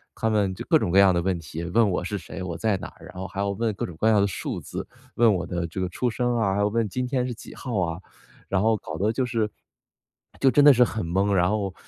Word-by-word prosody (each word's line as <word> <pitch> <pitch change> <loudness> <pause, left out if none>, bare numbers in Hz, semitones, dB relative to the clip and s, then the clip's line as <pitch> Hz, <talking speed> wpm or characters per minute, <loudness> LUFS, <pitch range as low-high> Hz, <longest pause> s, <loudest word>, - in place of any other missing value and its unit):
他 110 - 0
们 100 -3 +1
就 - - -7
各 - - +6
种 85 - -1
各 95 - +5
样 95 -2 +6
的 85 - +1
问 90 -1 -1
题， 80 +1 -7
问 105 +4 +3
我 90 - -1
是 100 +2 -3
谁， 95 0 -7
我 85 -3 -4
在 110 -3 +1
哪 - - -7
儿， - - -16
然 - - -13
后 95 +1 -5
还 100 - -8
要 100 0 0
问 110 +1 -1
各 - - -3
种 85 - -9
各 110 - +3
样 105 -2 +4
的 100 - +3
数 95 - -4
字。 - - -6 0.3
问 115 -3 +5
我 90 -1 -2
的 85 -1 -2
这 90 +4 -6
个 90 - 0
出 125 +7 -1
生 120 +1 0
啊， 100 -4 +1
还 - - 0
有 100 - +3
问 115 0 0
今 125 +4 -2
天 125 -1 0
是 120 - -3
几 - - -12
号 120 -7 -3
啊， 85 +1 -2 0.5
然 95 -1 +1
后 110 0 +3
搞 80 -4 -7
得 105 +3 +1
就 130 +1 0
是 115 -3 -1 0.9
就 135 -1 +5
真 145 0 +5
的 145 - +10
是 125 0 +5
很 110 -6 -2
懵。 95 +4 +1
然 90 0 +3
后 100 -3 -1
100 Hz, 310 characters per minute, -25 LUFS, 90-115 Hz, 0.9 s, 的